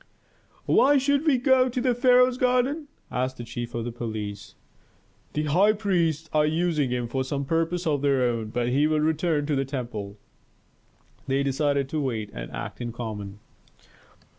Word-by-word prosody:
"Why 285 +2 +5
should 285 +3 +2
he 270 - +4
go 255 0 +4
to 250 - -2
the 250 0 +2
pharaoh's 250 0 +4
garden?" 255 +5 +1 0.2
asked 130 +1 -2
the 120 - -6
chief 120 0 -6
of 120 0 -3
police. 105 -4 -6 0.8
"The 150 - -1
high 185 +8 +4
priests 170 -7 0
are 155 -1 +4
using 155 -2 +1
him 125 -1 -2
for 130 +3 -2
some 140 +1 -3
purpose 165 +4 -1
of 145 -4 +1
their 140 -2 +2
own, 115 -3 0
but 120 +2 -1
he 140 +4 +3
will 155 0 +1
return 155 0 +1
to 150 -1 0
the 135 - +1
temple." 120 -7 -5 1.1
They 135 +1 +1
decided 140 0 0
to 155 +1 -1
wait 110 -6 -3
and - - -6
act - - -6
in 120 -1 -3
common. 105 -4 -6
145 Hz, 165 wpm, -25 LUFS, 120-185 Hz, 1.1 s, Why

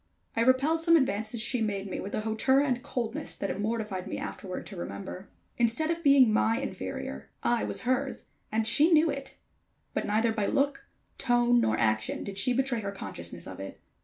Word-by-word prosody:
I 230 - +1
repelled 270 +7 +3
some 335 0 +5
advances 220 -5 +1
she 240 +2 +1
made 200 -2 -1
me 185 - -4
with 200 - -4
a - - -1
hauteur 220 +5 +2
and 260 -4 +1
coldness 235 -3 -4
that 195 - -3
it - - -5
mortified 210 -3 -2
me - - -4
afterward 185 -2 -6
to 200 - -9
remember. 185 +2 -7 0.3
Instead 240 +7 +2
of 335 0 -2
being 275 -7 +6
my 225 +1 +3
inferior, 95 - -5
I 240 -1 +2
was - - -2
her's, 255 +2 -1 0.3
and 220 +1 +1
she 305 +9 +5
knew 320 -1 +5
it; 275 -1 -7 0.6
but - - -2
neither 220 +2 +2
by 215 -3 -1
look, 280 0 0 0.3
tone 240 0 +3
nor 110 - +1
action 110 -1 0
did 195 -1 -4
she 250 - +2
betray 255 -1 +1
her 200 -1 -3
consciousness 195 - -6
of - - -8
it. - - -8
230 Hz, 190 wpm, -29 LUFS, 200-270 Hz, 0.6 s, being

